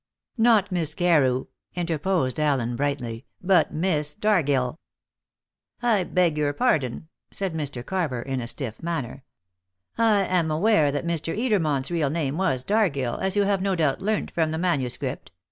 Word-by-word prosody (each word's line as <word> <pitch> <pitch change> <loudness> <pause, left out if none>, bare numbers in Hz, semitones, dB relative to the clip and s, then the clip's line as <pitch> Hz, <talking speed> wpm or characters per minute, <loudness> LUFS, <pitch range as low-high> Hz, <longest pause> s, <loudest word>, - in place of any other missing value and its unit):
"Not 225 -4 +4
Miss 160 -4 0
Carew," 145 -8 +2 0.3
interposed 165 -4 -1
Allen 135 -6 +1
brightly, 125 -4 -3
"but 185 0 +3
Miss 155 -3 0
Dargill." 155 - +1 1.0
"I 220 -6 +2
beg 175 -5 +1
your 145 -1 +1
pardon," 140 0 0 0.2
said 195 -4 -3
Mr. 140 -6 -4
Carver 155 -11 -2
in 135 -1 -3
a 115 - -5
stiff 115 -3 -4
manner. 140 -6 -4 0.8
"I 215 -4 +4
am 180 -4 +1
aware 155 -2 +3
that 145 +4 -3
Mr. 165 +1 -2
Edermont's 170 - 0
real 160 -5 +1
name 150 -2 -1
was 180 -10 0
Dargill, 150 - 0
as 190 +1 0
you 205 - +3
have 200 -1 +1
no 195 -1 0
doubt 155 -5 0
learnt 210 +2 -1
from 160 -2 0
the 160 - -2
manuscript. 135 - -2
160 Hz, 150 wpm, -25 LUFS, 135-185 Hz, 1.0 s, Not